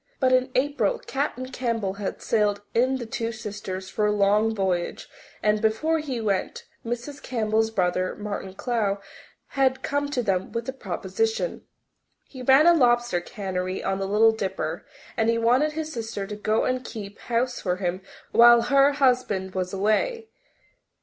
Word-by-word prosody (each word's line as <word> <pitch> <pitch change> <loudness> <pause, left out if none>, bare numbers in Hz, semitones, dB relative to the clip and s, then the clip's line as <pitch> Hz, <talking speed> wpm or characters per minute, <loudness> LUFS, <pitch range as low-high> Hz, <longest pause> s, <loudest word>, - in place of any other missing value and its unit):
But 260 -1 +3
in 255 0 +3
April 260 -5 +1
Captain 265 -2 -3
Campbell 230 -6 -1
had 195 - -4
sailed 205 -2 +1
in 255 +3 +2
the 240 - -6
Two 230 +1 -3
Sisters 205 -4 -6
for 210 +2 0
a - - +2
long 210 +2 +2
voyage 185 -3 -1 0.4
and, 210 0 +2
before 300 +9 +1
he 275 -6 -3
went, 200 -4 -2 0.2
Mrs. 240 +5 -5
Campbell's 220 -2 0
brother, 185 -3 0
Martin 200 -2 -5
Clowe, 215 -4 0 0.5
had 265 -1 +1
come 285 0 -1
to 255 -4 -1
them 190 -3 -1
with 230 0 -3
a 265 - -3
proposition. 450 - -2 0.6
He 260 - -10
ran 265 +4 +6
a 345 - +8
lobster 240 - +3
cannery 185 -1 -4
on 195 0 -1
the 195 - -2
Little 215 +3 +5
Dipper, 205 -4 -4 0.3
and 225 -3 +1
he 230 - +2
wanted 250 +7 +3
his 315 0 -4
sister 225 -4 -4
to 210 +1 -6
go 215 +1 0
and 255 0 -1
keep 205 -4 -8
house 245 +1 -1
for 180 -2 0
him 185 0 -2 0.3
while 235 0 +8
her 275 +1 +4
husband 250 -9 +1
was 185 -1 -2
away. 325 - 0
225 Hz, 165 wpm, -25 LUFS, 200-255 Hz, 0.6 s, a